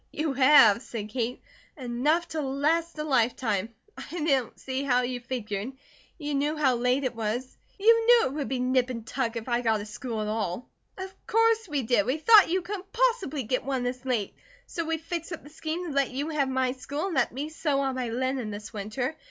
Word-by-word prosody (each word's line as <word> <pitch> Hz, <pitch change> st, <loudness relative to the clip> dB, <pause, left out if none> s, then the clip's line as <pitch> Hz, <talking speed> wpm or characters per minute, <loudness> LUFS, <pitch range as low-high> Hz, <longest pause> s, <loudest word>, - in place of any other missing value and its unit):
"You 305 Hz, -2 st, -1 dB
have," 260 Hz, -5 st, +7 dB
said 220 Hz, -5 st, -6 dB
Kate. 240 Hz, +2 st, -3 dB, 0.3 s
"Enough 290 Hz, +7 st, 0 dB
to 315 Hz, -, -2 dB
last 305 Hz, +5 st, 0 dB
a 300 Hz, -, -2 dB
lifetime. 230 Hz, -6 st, +1 dB, 0.3 s
I 340 Hz, -2 st, -6 dB
don't 270 Hz, -7 st, 0 dB
see 265 Hz, 0 st, -3 dB
how 250 Hz, -3 st, +2 dB
you 245 Hz, 0 st, -2 dB
figured. 235 Hz, -2 st, -4 dB, 0.4 s
You 295 Hz, -3 st, -4 dB
knew 295 Hz, +3 st, 0 dB
how 275 Hz, -4 st, +3 dB
late 250 Hz, +3 st, +1 dB
it 255 Hz, -, -1 dB
was. 230 Hz, +3 st, -3 dB, 0.2 s
You 455 Hz, +3 st, +5 dB
knew 480 Hz, -1 st, +7 dB
it 260 Hz, -, -2 dB
would 290 Hz, -2 st, -3 dB
be 265 Hz, -, -1 dB
nip 255 Hz, 0 st, +2 dB
and 230 Hz, -3 st, -5 dB
tuck 240 Hz, 0 st, -2 dB
if 230 Hz, 0 st, -5 dB
I 240 Hz, -1 st, +1 dB
got 225 Hz, -3 st, +1 dB
a 205 Hz, -, -6 dB
school 225 Hz, +1 st, -5 dB
at 210 Hz, -, -2 dB
all." 215 Hz, 0 st, -2 dB, 0.3 s
"Of 380 Hz, 0 st, -6 dB
course 455 Hz, -1 st, +3 dB
we 290 Hz, -5 st, -1 dB
did! 220 Hz, -2 st, +2 dB
We 260 Hz, +4 st, +1 dB
thought 415 Hz, +4 st, +7 dB
you 365 Hz, +1 st, 0 dB
couldn't 390 Hz, +1 st, -6 dB
possibly 460 Hz, -, +1 dB
get 250 Hz, +3 st, -1 dB
one, 265 Hz, -2 st, -1 dB
this 250 Hz, +1 st, -3 dB
late, 240 Hz, -7 st, -1 dB, 0.3 s
so 335 Hz, -, -4 dB
we 325 Hz, 0 st, -1 dB
fixed 335 Hz, +1 st, -5 dB
up 330 Hz, -, -7 dB
the 295 Hz, -, -14 dB
scheme 320 Hz, +3 st, -4 dB
to 335 Hz, -, -4 dB
let 275 Hz, -1 st, +2 dB
you 280 Hz, +4 st, -3 dB
have 290 Hz, -4 st, 0 dB
my 260 Hz, -1 st, +1 dB
school, 285 Hz, +5 st, -4 dB
and 385 Hz, -, -3 dB
let 260 Hz, -3 st, +2 dB
me 280 Hz, +5 st, -4 dB
sew 295 Hz, -3 st, 0 dB
on 270 Hz, -1 st, 0 dB
my 255 Hz, -2 st, -3 dB
linen 255 Hz, 0 st, -2 dB
this 210 Hz, +2 st, -8 dB
winter. 220 Hz, +8 st, -3 dB
265 Hz, 220 wpm, -27 LUFS, 240-315 Hz, 0.4 s, have